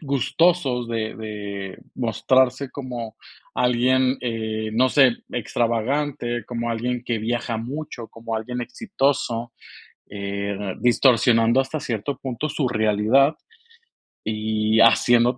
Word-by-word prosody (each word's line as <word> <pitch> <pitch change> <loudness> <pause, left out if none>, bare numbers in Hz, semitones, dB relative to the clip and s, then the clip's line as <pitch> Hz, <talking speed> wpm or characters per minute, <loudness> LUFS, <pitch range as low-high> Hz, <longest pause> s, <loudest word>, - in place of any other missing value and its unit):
gustosos 140 -2 +1
de 110 -2 -2
de 100 -3 -6 0.2
mostrarse 130 +2 +1
como 120 -5 -6 0.4
alguien, 125 +1 +2
eh, 110 -2 -3
no 125 +3 +3
sé, 130 -3 +5 0.2
extravagante, 120 +1 -1
como 120 -1 -3
alguien 120 +1 -2
que 120 -2 -1
viaja 115 +1 -2
mucho, 120 -1 -6
como 115 0 -5
alguien 125 +3 -4
exitoso, 130 - -1 0.6
eh, 100 -1 -4
distorsionando 120 -1 +4
hasta 135 +4 -4
cierto 120 +2 -3
punto 135 +3 -4
su 145 -2 0
realidad. 110 +5 +3 0.9
Y 110 0 0
haciendo, 120 +1 +5
120 Hz, 105 wpm, -23 LUFS, 110-130 Hz, 0.9 s, sé